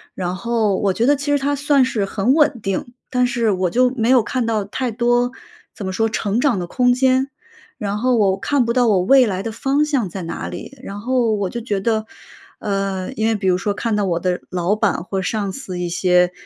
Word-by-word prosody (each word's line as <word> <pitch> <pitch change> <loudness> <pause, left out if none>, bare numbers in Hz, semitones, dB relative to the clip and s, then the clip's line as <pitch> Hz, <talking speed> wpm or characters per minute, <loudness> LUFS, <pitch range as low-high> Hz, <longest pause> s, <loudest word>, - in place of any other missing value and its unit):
然 180 -1 -3
后 220 0 0
我 195 -2 +1
觉 225 - 0
得 290 +3 +4
其 285 +1 -3
实 285 - +4
它 285 +1 0
算 285 -1 +3
是 225 -5 -1
很 205 +5 +1
稳 290 -5 +3
定， 195 +5 -3 0.2
但 250 -1 +2
是 235 -3 +1
我 185 -1 0
就 250 +6 +3
没 230 0 0
有 255 -2 +6
看 250 +1 -2
到 215 -3 0
太 250 +4 -3
多， 240 +2 +1 0.4
怎 200 - -7
么 190 - -3
说 225 +3 +1
成 215 0 -1
长 250 -9 +2
的 175 - -4
空 250 +6 +2
间， 260 +1 +2 0.5
然 205 0 -3
后 245 +2 +2
我 195 -2 +2
看 250 +5 +1
不 235 - 0
到 245 -2 +3
我 200 -4 +3
未 265 +6 +5
来 190 -4 -2
的 225 - -3
方 275 +5 +1
向 270 -11 0
在 185 0 -6
哪 165 - -5
里， 275 - -9
然 200 -3 -7
后 240 0 +1
我 200 -2 -2
就 235 - -5
觉 210 -4 -2
得， 220 +1 0 0.5
呃， 195 +1 -2
因 220 -3 0
为 225 - +2
比 195 -2 -2
如 180 -1 +3
说 200 +2 -1
看 225 +2 -1
到 210 - +1
我 170 -2 0
的 180 0 -1
老 180 +2 0
板 215 - 0
或 190 0 -2
上 200 0 -2
司 185 -9 -6
一 175 - -2
些 180 0 +3
220 Hz, 250 characters per minute, -20 LUFS, 195-250 Hz, 0.5 s, 有